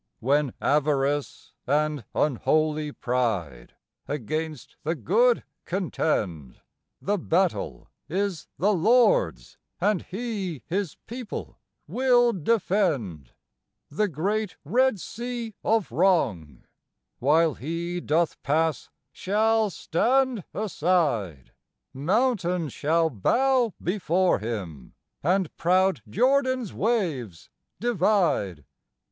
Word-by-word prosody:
When 140 Hz, +1 st, +1 dB
Avarice 145 Hz, -1 st, 0 dB
and 150 Hz, -2 st, 0 dB
unholy 155 Hz, +2 st, +1 dB
Pride 105 Hz, -, -2 dB, 0.3 s
against 155 Hz, +2 st, -4 dB
the 160 Hz, +3 st, -1 dB
good 225 Hz, -, +2 dB, 0.2 s
contend, 105 Hz, -, -2 dB, 0.4 s
The 205 Hz, 0 st, -1 dB
battle 170 Hz, -, 0 dB, 0.2 s
is 190 Hz, 0 st, -2 dB
the 205 Hz, +4 st, +2 dB
Lord's 245 Hz, -, +2 dB, 0.2 s
and 205 Hz, -4 st, +1 dB
He 195 Hz, -, -5 dB
His 190 Hz, -2 st, -2 dB
people 240 Hz, -1 st, -7 dB, 0.3 s
will 245 Hz, -2 st, +3 dB
defend. 165 Hz, -, 0 dB, 0.6 s
The 210 Hz, +8 st, +1 dB
great 200 Hz, +5 st, -2 dB
Red 255 Hz, -3 st, +2 dB
Sea 235 Hz, +2 st, -5 dB
of 220 Hz, -, +1 dB
wrong, 120 Hz, -, +1 dB, 0.6 s
while 155 Hz, +4 st, +3 dB
He 170 Hz, +5 st, -4 dB
doth 165 Hz, +2 st, 0 dB
pass, 160 Hz, +1 st, 0 dB, 0.2 s
shall 220 Hz, +2 st, +1 dB
stand 245 Hz, +5 st, +1 dB
aside; 150 Hz, -, 0 dB, 0.4 s
Mountains 180 Hz, -, 0 dB
shall 160 Hz, +2 st, +1 dB
bow 245 Hz, -, +2 dB
before 180 Hz, -, +1 dB
Him, 95 Hz, -, -6 dB, 0.3 s
and 180 Hz, +1 st, 0 dB
proud 185 Hz, -4 st, +2 dB
Jordan's 260 Hz, -, +1 dB
waves 160 Hz, -, -2 dB, 0.3 s
divide. 180 Hz, -, +1 dB
170 Hz, 90 wpm, -26 LUFS, 140-215 Hz, 0.6 s, will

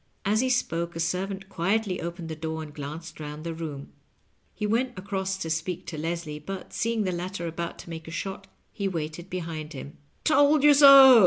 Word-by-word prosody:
As 210 Hz, +2 st, +3 dB
he 260 Hz, +1 st, +2 dB
spoke 170 Hz, -9 st, 0 dB
a -, -, -4 dB
servant 190 Hz, +3 st, -2 dB
quietly 195 Hz, +2 st, 0 dB
opened 170 Hz, 0 st, -5 dB
the 160 Hz, -, -4 dB
door 160 Hz, 0 st, -4 dB
and 150 Hz, -1 st, -10 dB
glanced 155 Hz, +3 st, -7 dB
round 150 Hz, 0 st, -6 dB
the 165 Hz, 0 st, -3 dB
room. 155 Hz, -4 st, -6 dB, 0.6 s
He 210 Hz, -, -2 dB
went 240 Hz, +2 st, 0 dB
across 190 Hz, 0 st, -2 dB
to 165 Hz, -, -4 dB
speak 165 Hz, +3 st, -2 dB
to 155 Hz, -, -6 dB
Leslie, 165 Hz, -2 st, -3 dB
but, 190 Hz, +5 st, -7 dB
seeing 230 Hz, -1 st, 0 dB
the 185 Hz, -, 0 dB
latter 180 Hz, 0 st, -4 dB
about 170 Hz, +1 st, -4 dB
to -, -, -11 dB
make 160 Hz, 0 st, -7 dB
a -, -, -6 dB
shot, 190 Hz, +3 st, -5 dB, 0.3 s
he 200 Hz, -, -1 dB
vira 165 Hz, -5 st, -2 dB
ited 175 Hz, +4 st, -10 dB
behind 165 Hz, -4 st, -5 dB
him. 140 Hz, +1 st, -8 dB
" -, -, -40 dB
Told 290 Hz, -1 st, +5 dB
you 295 Hz, 0 st, +8 dB
so 275 Hz, -3 st, +10 dB
175 Hz, 210 wpm, -27 LUFS, 160-200 Hz, 0.6 s, so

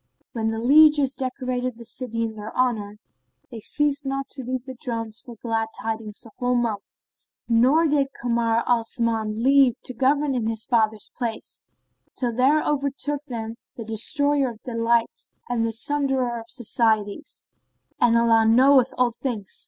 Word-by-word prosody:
Then 225 Hz, -2 st, -1 dB
the 225 Hz, 0 st, -1 dB
lieges 285 Hz, +2 st, +5 dB
decorated 255 Hz, -2 st, -3 dB
the 235 Hz, -, -11 dB
city 230 Hz, -1 st, -3 dB
in 225 Hz, -1 st, -3 dB
their 215 Hz, 0 st, -8 dB
honour 235 Hz, -5 st, +1 dB
and 210 Hz, +1 st, -16 dB, 0.5 s
they 230 Hz, -, -7 dB
ceased 290 Hz, +5 st, 0 dB
not 275 Hz, 0 st, -3 dB
to 265 Hz, -, -7 dB
beat 255 Hz, +1 st, -4 dB
the 260 Hz, -, -7 dB
drums 230 Hz, -3 st, -5 dB
for 245 Hz, -3 st, -11 dB
glad 225 Hz, 0 st, -2 dB
tidings 220 Hz, -1 st, -4 dB
a 225 Hz, -, -13 dB
whole 250 Hz, -1 st, +1 dB
month; 230 Hz, -4 st, -2 dB, 0.5 s
nor 255 Hz, +8 st, +4 dB
did 290 Hz, -3 st, +2 dB
Kamar 235 Hz, -1 st, +1 dB
al 240 Hz, -2 st, +3 dB
Zaman 225 Hz, -1 st, -2 dB
leave 270 Hz, -2 st, +4 dB
to 255 Hz, -, -3 dB
govern 280 Hz, +3 st, +1 dB
in 235 Hz, -4 st, -1 dB
his 225 Hz, -1 st, -1 dB
father's 220 Hz, -3 st, 0 dB
place, 230 Hz, -3 st, -4 dB, 0.5 s
till 245 Hz, -2 st, -1 dB
there 270 Hz, +6 st, +3 dB
overtook 285 Hz, 0 st, -1 dB
them 230 Hz, -3 st, -6 dB, 0.2 s
the 230 Hz, -, -7 dB
Destroyer 280 Hz, +5 st, +3 dB
of 225 Hz, -2 st, -12 dB
delights 235 Hz, -, 0 dB, 0.2 s
and 240 Hz, -2 st, 0 dB
the 230 Hz, -, 0 dB
Sunderer 265 Hz, -1 st, -1 dB
of 230 Hz, 0 st, -12 dB
societies; 220 Hz, -4 st, 0 dB, 0.5 s
and 235 Hz, -1 st, +4 dB
Allah 225 Hz, -1 st, +4 dB
knoweth 260 Hz, +2 st, +5 dB
all 250 Hz, -1 st, +3 dB
things! 230 Hz, -4 st, -5 dB
240 Hz, 160 wpm, -24 LUFS, 225-270 Hz, 0.5 s, lieges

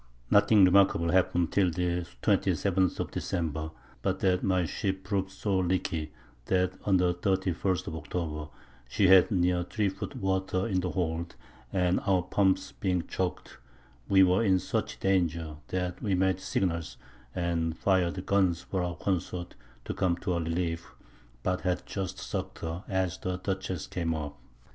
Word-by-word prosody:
Nothing 100 Hz, -1 st, +6 dB
remarkable 90 Hz, -3 st, +4 dB
happen'd 90 Hz, -2 st, +2 dB
till 95 Hz, -3 st, +3 dB
the 90 Hz, 0 st, -1 dB, 0.2 s
27th 95 Hz, -2 st, +2 dB
of -, -, -3 dB
December, 80 Hz, -3 st, -2 dB, 0.3 s
but -, -, -1 dB
that 90 Hz, -1 st, +2 dB
my 95 Hz, -2 st, +2 dB
Ship 95 Hz, +5 st, -2 dB
prov'd 95 Hz, -1 st, -1 dB
so 95 Hz, 0 st, -1 dB
leaky, 85 Hz, -4 st, -1 dB, 0.3 s
that 90 Hz, +2 st, +1 dB
on 95 Hz, -2 st, +4 dB
the 90 Hz, -1 st, +2 dB
31st 95 Hz, 0 st, 0 dB
of 80 Hz, -, -5 dB
October 75 Hz, 0 st, -4 dB, 0.4 s
she 95 Hz, +9 st, +3 dB
had 95 Hz, -1 st, +7 dB
near 90 Hz, -3 st, +2 dB
3 100 Hz, +3 st, 0 dB
Foot 95 Hz, +9 st, -6 dB
Water 95 Hz, -4 st, 0 dB
in 95 Hz, -4 st, +1 dB
the 90 Hz, 0 st, -1 dB
Hold, 85 Hz, -2 st, -2 dB, 0.4 s
and 90 Hz, -1 st, +2 dB
our 95 Hz, -2 st, +3 dB
Pumps 95 Hz, 0 st, +1 dB
being 90 Hz, -3 st, -1 dB
choak'd, 90 Hz, -1 st, -4 dB, 0.5 s
we 95 Hz, -1 st, +7 dB
were 95 Hz, +4 st, +3 dB
in 95 Hz, -4 st, +4 dB
such 90 Hz, -, -2 dB
Danger, 85 Hz, -5 st, 0 dB
that 90 Hz, -1 st, -3 dB
we 100 Hz, -3 st, +1 dB
made 95 Hz, 0 st, +2 dB
Signals, 85 Hz, -4 st, -2 dB, 0.4 s
and 85 Hz, -2 st, -1 dB
fir'd 95 Hz, -1 st, +1 dB
Guns 95 Hz, -4 st, +2 dB
for 95 Hz, -, -2 dB
our 90 Hz, -1 st, -2 dB
Consorts 90 Hz, 0 st, -3 dB, 0.3 s
to -, -, -3 dB
come 85 Hz, -2 st, +1 dB
to 90 Hz, -, -1 dB
our 85 Hz, -, 0 dB
Relief, 85 Hz, 0 st, -3 dB, 0.5 s
but 90 Hz, 0 st, 0 dB
had 90 Hz, -1 st, -1 dB
just 95 Hz, -3 st, -4 dB
suck'd -, -, -4 dB
her 85 Hz, +3 st, -4 dB
as 95 Hz, -2 st, -1 dB
the 90 Hz, 0 st, -2 dB
Dutchess 95 Hz, -3 st, -3 dB
came 85 Hz, -2 st, -2 dB
up. 75 Hz, -2 st, -5 dB
90 Hz, 160 wpm, -29 LUFS, 85-95 Hz, 0.5 s, had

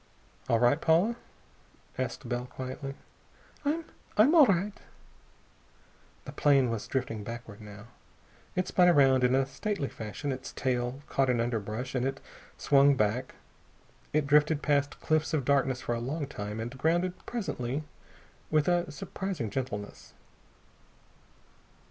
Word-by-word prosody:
"All 115 Hz, -, +4 dB
right, 120 Hz, +6 st, +3 dB
Paula?" 175 Hz, +9 st, +3 dB, 0.8 s
asked 130 Hz, 0 st, -4 dB
Bell 120 Hz, +1 st, -2 dB
quietly. 130 Hz, +2 st, -6 dB, 0.7 s
"I 310 Hz, +3 st, 0 dB, 0.3 s
I'm 235 Hz, +9 st, +6 dB
all 310 Hz, -6 st, +8 dB
right." 195 Hz, +1 st, +1 dB, 1.5 s
The -, -, -7 dB
plane 135 Hz, -4 st, +3 dB
was 115 Hz, -2 st, -4 dB
drifting 120 Hz, -5 st, -2 dB
backward, 115 Hz, -1 st, -8 dB
now. 105 Hz, 0 st, -11 dB, 0.7 s
It 185 Hz, -, 0 dB
spun 180 Hz, -1 st, +4 dB
around 135 Hz, -5 st, +5 dB
in 125 Hz, +1 st, +4 dB
a 135 Hz, 0 st, +3 dB
stately 140 Hz, +3 st, -3 dB
fashion, 110 Hz, +7 st, -5 dB
its 130 Hz, 0 st, -6 dB
tail 125 Hz, +1 st, -1 dB
caught 135 Hz, -1 st, +1 dB
in 125 Hz, -2 st, +2 dB
underbrush, 115 Hz, +1 st, -2 dB
and 125 Hz, -2 st, 0 dB
it 135 Hz, 0 st, -4 dB, 0.4 s
swung 140 Hz, 0 st, +5 dB
back. 115 Hz, +3 st, 0 dB, 0.8 s
It 150 Hz, -1 st, +1 dB
drifted 150 Hz, +1 st, +3 dB
past 145 Hz, -1 st, +1 dB
cliffs 155 Hz, 0 st, +1 dB
of 140 Hz, -5 st, -1 dB
darkness 135 Hz, -2 st, +2 dB
for 120 Hz, -, -2 dB
a 115 Hz, -, -2 dB
long 145 Hz, +6 st, -3 dB
time, 105 Hz, -6 st, -6 dB
and 120 Hz, +3 st, -5 dB
grounded, 170 Hz, +6 st, +1 dB
presently, 150 Hz, -, -3 dB, 0.7 s
with 155 Hz, -1 st, +2 dB
a 175 Hz, -2 st, +2 dB
surprising 150 Hz, -, -4 dB
gentleness. 120 Hz, -6 st, -5 dB
135 Hz, 135 wpm, -29 LUFS, 120-155 Hz, 1.5 s, all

